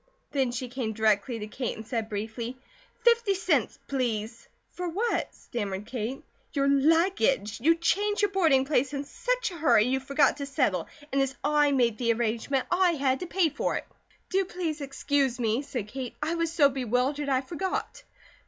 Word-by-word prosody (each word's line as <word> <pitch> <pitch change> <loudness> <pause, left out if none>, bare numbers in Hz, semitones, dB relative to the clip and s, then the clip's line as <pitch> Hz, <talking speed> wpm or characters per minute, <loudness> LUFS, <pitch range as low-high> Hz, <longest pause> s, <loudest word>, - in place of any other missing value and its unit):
Then 265 -4 +1
she 250 +1 -4
came 240 -3 -3
directly 220 +2 +1
to 210 - -5
Kate 240 +4 -4
and 220 - -8
said 225 -1 -3
briefly: 225 +4 -4 0.5
"Fifty 470 -4 +4
cents, 390 +4 +1
please!" 230 -4 -2 0.2
"For 360 -1 -4
what?" 435 +8 0
stammered 205 -4 -4
Kate. 255 +5 -4 0.3
"Your 275 -1 +1
luggage. 280 - +2
You 330 +5 +5
changed 410 +5 +1
your 410 - +3
boarding 320 -9 +3
place 275 -1 +1
in 280 - -2
such - - -2
a 345 - -8
hurry 310 -9 +5
you 260 +3 +1
forgot 280 +2 +2
to 280 -1 -4
settle, 255 - 0 0.2
and 275 - +2
as 270 0 -1
I 295 0 +3
made 240 -5 +2
the 235 -2 +2
arrangement, 235 +4 -1
I 355 -1 +4
had 270 -3 +1
to 360 - -5
pay 345 -3 +1
it." - - -1 0.5
"Do 390 0 +3
please 335 -4 -3
excuse 275 -2 0
me," 230 +1 +1
said 245 -7 -5
Kate. 255 +2 -6
"I 305 +3 -1
was 335 -1 -1
so 305 -4 +5
bewildered, 265 +2 -1
I 260 -1 +2
forgot." 350 +7 -4
270 Hz, 175 wpm, -28 LUFS, 235-325 Hz, 0.5 s, You